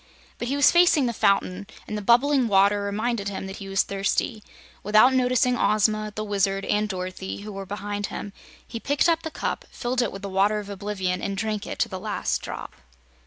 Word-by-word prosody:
But 240 - -3
he 275 - 0
was 285 - +5
facing 345 -5 +5
the 235 - -1
fountain, 200 -2 +1 0.2
and 215 - -4
the 210 - -3
bubbling 250 +4 +4
water 200 0 +4
reminded 205 +1 -2
him 195 -1 -5
that 190 +1 -7
he 195 -1 -8
was 195 0 +2
thirsty. 200 +3 -1 0.4
Without 215 +5 +5
noticing 250 -1 +2
Ozma, 215 -1 +1
the 215 - -3
Wizard 195 -1 0
and 210 0 0
Dorothy, 185 0 -5
who 210 +1 -7
were 195 0 -7
behind 205 +1 -4
him, 200 - -7 0.3
he 230 - -6
picked 285 +6 +1
up 330 -1 +2
the 320 - -5
cup, - - -3
filled 250 +1 -2
it 235 - -1
with 195 0 -9
the - - -3
Water 200 +2 +2
of 205 -1 -6
Oblivion, 190 -2 -3
and 200 -1 -3
drank 215 0 -2
it - - -5
to - - +1
the - - -6
last - - -2
drop. - - -7
210 Hz, 210 wpm, -25 LUFS, 195-240 Hz, 0.4 s, was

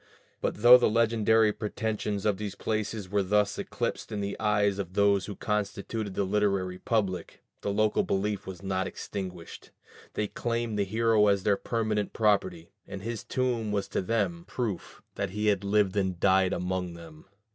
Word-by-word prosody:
But 105 - -2
though 125 +1 +10
the 120 - +3
legendary 110 -1 +3
pretensions 105 -2 -3
of 105 -3 +2
these 100 -1 -5
places 110 -1 -2
were 100 +2 +1
thus 105 +1 +1
eclipsed - - -3
in 105 - -3
the 100 0 -3
eyes 105 -2 +2
of 95 -2 -4
those 100 -2 +3
who 100 - -6
constituted 105 0 -3
the - - +1
literary 95 -2 0
public, 100 -8 -2 0.2
the - - -2
local 110 - +2
belief 105 - -1
was 95 0 -8
not 95 -1 -1
extinguished; 90 -4 -7 0.5
they 105 - 0
claimed 115 -1 -2
the 100 - +2
hero 110 +1 +3
as 100 -2 +2
their 100 0 +3
permanent 110 -2 -1
property, 95 -6 +1 0.2
and 95 -1 -7
his 115 -1 -4
tomb 120 -4 -1
was 100 -1 -1
to - - -1
them 95 -4 -1
a - - -20
proof 110 -8 -4
that - - -2
he 105 +3 -3
had 100 -1 +1
lived 100 -1 +2
and 95 -3 0
died 95 -1 +4
among 90 -1 -2
them. 80 -2 -13
105 Hz, 175 wpm, -28 LUFS, 95-110 Hz, 0.5 s, though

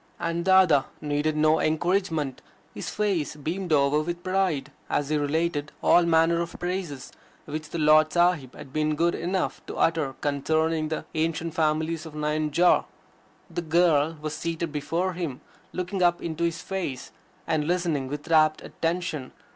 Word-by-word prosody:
And 170 0 -1
Dada 185 -7 +5
needed 150 +1 -1
no 155 +1 +4
encouragement. 160 -3 0 0.3
His - - -5
face 195 -9 -1
beamed 170 +5 -4
over 145 0 +3
with 175 +2 -4
pride 185 -6 0 0.2
as 145 -1 0
he 155 - +1
related 150 +1 -1
all 175 -1 +5
manner 165 +1 +3
of 170 - -5
praises, 175 -7 -4 0.3
which 155 +1 -5
the - - -4
Lard 155 0 +5
Sahib 175 -7 +2
had 130 - -11
been 155 0 +1
good 170 +3 +2
enough 180 +2 -2
to - - -6
utter 160 -5 +1
concerning 155 +3 0
the 155 - -4
ancient 160 0 -1
families 160 +1 0
of 155 - -11
Nayanjore. 150 +3 +2 0.6
The 175 - -4
girl 165 -2 +2
was 155 0 -4
seated 165 +1 -3
before 165 +5 -1
him, 165 -7 -4 0.3
looking 185 +1 -3
up 175 -1 +3
into 170 0 -2
his 165 0 -2
face, 180 -10 -4 0.3
and 155 -1 0
listening 170 -6 0
with 145 +4 -6
rapt 155 -2 +3
attention. 165 -5 -3
160 Hz, 155 wpm, -26 LUFS, 150-175 Hz, 0.6 s, Dada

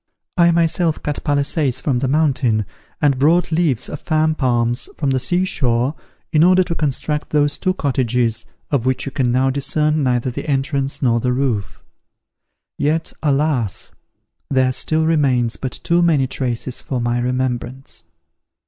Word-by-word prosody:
I 170 -1 +5
myself 165 -1 +1
cut 150 -1 -3
palisades 140 -2 0
from 130 -3 0
the 135 - -1
mountain, 135 -7 +1 0.4
and 140 -3 +3
brought 165 +5 +3
leaves 155 -7 +1
of 150 - -6
fan 155 -1 +1
palms 120 -4 0
from 140 -3 0
the 130 - +1
sea 175 +9 +1
shore 125 -5 0 0.4
in 155 -1 +4
order 185 +1 +5
to 170 - -3
construct 150 0 -2
those 145 -1 +1
two 185 -1 0
cottages, 125 -6 0 0.3
of 130 -4 0
which 130 -1 0
you 135 - -4
can 130 -3 0
now 130 +2 +2
discern 150 +3 +1
neither 125 -1 0
the 140 - -6
entrance 135 0 -1
nor 120 -2 +3
the 125 +2 0
roof. 125 -7 -2 1.0
Yet, 155 +3 0
alas! 140 - 0 0.6
there 130 -1 +2
still 155 +5 +1
remains 130 -7 +2
but 130 - -5
too 170 0 +2
many 160 -6 +3
traces 125 -1 -3
for 130 - -3
my 120 0 0
remembrance! 125 +1 -3
135 Hz, 155 wpm, -19 LUFS, 125-155 Hz, 1.0 s, I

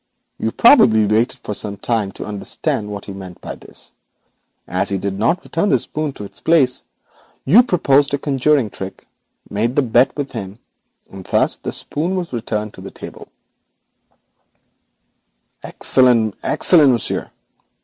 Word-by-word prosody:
You 110 - -1
probably 115 - +6
waited 110 +3 0
for 105 - -4
some 100 0 -3
time 105 -1 -1
to - - -7
understand 105 0 -3
what 100 -1 -7
he 100 - -7
meant 95 -2 -10
by - - -7
this, - - -10 0.7
and - - -6
as - - 0
he 100 - -1
did 95 +1 -3
not 165 - +1
return 165 +5 -1
the 135 - +4
spoon 150 +5 -3
to 105 - -9
its 100 -1 -8
place, 140 -7 +3 0.6
you 190 - +7
proposed 145 - +2
a - - -3
conjuring 135 -4 +1
trick, 95 0 -8 0.4
made 115 +5 -1
the 145 - +3
bet 125 +2 +3
with 140 -2 -3
him, 100 -3 -7 0.5
and 95 -1 -9
thus - - +1
the - - -5
spoon 170 +6 -2
was 175 -6 -4
returned 110 -2 -3
to - - -12
the - - -8
table.' - - -11 2.4
'Excellent! 120 -5 +2
excellent, 150 -7 +4
monsieur! 115 - -2
120 Hz, 155 wpm, -19 LUFS, 105-145 Hz, 2.4 s, you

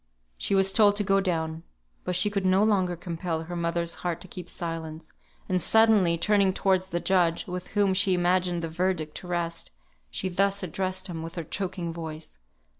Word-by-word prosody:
She 195 - -1
was 195 0 +3
told 205 -2 +5
to 205 - 0
go 195 0 +3
down. 160 -4 -2 0.4
But 180 - -1
she 185 +4 +2
could 200 -1 -1
no 190 +2 +4
longer 190 -5 +2
compel 165 -1 -4
her 175 +2 -6
mother's 170 0 -1
heart 175 -2 -2
to - - -10
keep 180 -1 -8
silence, 160 -2 -6 0.3
and 185 -1 0
suddenly 215 -6 +4
turning 200 +1 +3
towards 190 -1 +1
the 175 -2 -2
judge 170 -1 +1
(with 180 0 -5
whom 200 -2 +4
she 185 0 +2
imagined 180 -1 +1
the - - -1
verdict 165 -2 -1
to 180 - -9
rest), 170 -1 -3 0.4
she 125 - -3
thus 195 +2 +1
addressed 185 +2 -2
him 170 -4 -5
with 165 +1 -7
her 170 - -3
choking 175 0 -3
voice. 160 - -8
180 Hz, 190 wpm, -27 LUFS, 170-190 Hz, 0.4 s, told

